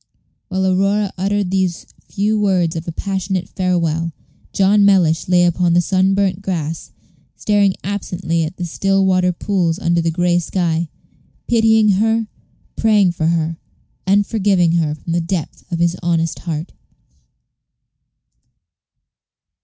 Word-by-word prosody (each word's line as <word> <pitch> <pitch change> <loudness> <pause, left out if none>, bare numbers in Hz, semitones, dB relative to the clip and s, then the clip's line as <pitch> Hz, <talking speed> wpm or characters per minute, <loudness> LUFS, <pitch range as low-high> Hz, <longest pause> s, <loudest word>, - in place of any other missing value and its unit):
While 190 -1 -1
Aurora 195 +2 +1
uttered 195 0 -1
these 185 -3 -1 0.2
few 210 +2 0
words 185 -5 +1
of 165 +1 -5
passionate 190 -2 -2
farewell, 165 -3 -1 0.4
John 200 +1 +3
Mellish 180 -5 +3
lay 180 -1 +4
upon 175 0 +1
the 175 - +4
sun 190 +2 +2
burnt 195 -1 0
grass, 165 -5 -4 0.5
staring 205 -2 +1
absently 180 -4 -2
at 160 +4 -5
the 180 - -3
still 195 +3 +1
water 185 -1 +2
pools 175 -2 -1
under 170 -4 +1
the 165 - 0
gray 175 +1 +1
sky 170 -2 -1 0.6
pitying 220 -2 +3
her, 225 0 +1 0.5
praying 210 -4 +3
for 165 -2 -2
her, 165 -1 -1 0.5
and 200 +1 +3
forgiving 195 -5 +2
her 160 -3 0
from 165 +2 -6
the 170 - +1
depth 170 -1 -5
of 170 - -1
his 170 +1 +1
honest 165 -1 -1
heart. 160 -1 -5
180 Hz, 130 wpm, -18 LUFS, 170-195 Hz, 0.6 s, lay